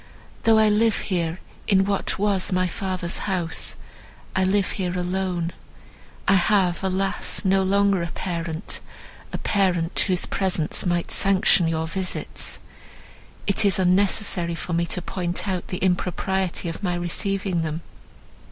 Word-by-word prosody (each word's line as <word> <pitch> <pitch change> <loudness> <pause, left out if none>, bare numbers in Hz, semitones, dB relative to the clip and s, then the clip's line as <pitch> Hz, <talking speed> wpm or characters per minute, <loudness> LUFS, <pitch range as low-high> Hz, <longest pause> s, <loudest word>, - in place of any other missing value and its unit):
Though 225 -1 +5
I 220 0 +5
live 215 +1 +3
here 170 -2 -1 0.3
in 195 -2 +4
what 200 -1 0
was 200 -1 +1
my 185 0 +2
father's 185 -1 -3
house, 175 -4 -1 0.6
I 190 - +3
live 195 +1 +2
here 180 -2 -2
alone. 180 -1 -1 0.8
I - - +5
have, 190 -1 +3
alas! 195 +2 -1
no 190 0 +4
longer 200 0 +2
a 170 - -2
parent—a 170 0 -6
parent, 185 -4 +1
whose 180 -2 +3
presence 180 -3 -1
might 175 -1 0
sanction 190 -3 +4
your 160 0 -1
visits. 185 +3 -4 0.9
It 200 +2 +2
is 200 -3 +3
unnecessary 185 -2 +2
for 170 - -4
me 170 +1 +1
to 180 - -1
point 180 +1 -2
out 185 -2 -2
the 180 - -3
impropriety 185 0 -1
of 165 - -5
my 180 -3 0
receiving 185 +1 -1
them." 160 0 -3
185 Hz, 135 wpm, -24 LUFS, 175-195 Hz, 0.9 s, Though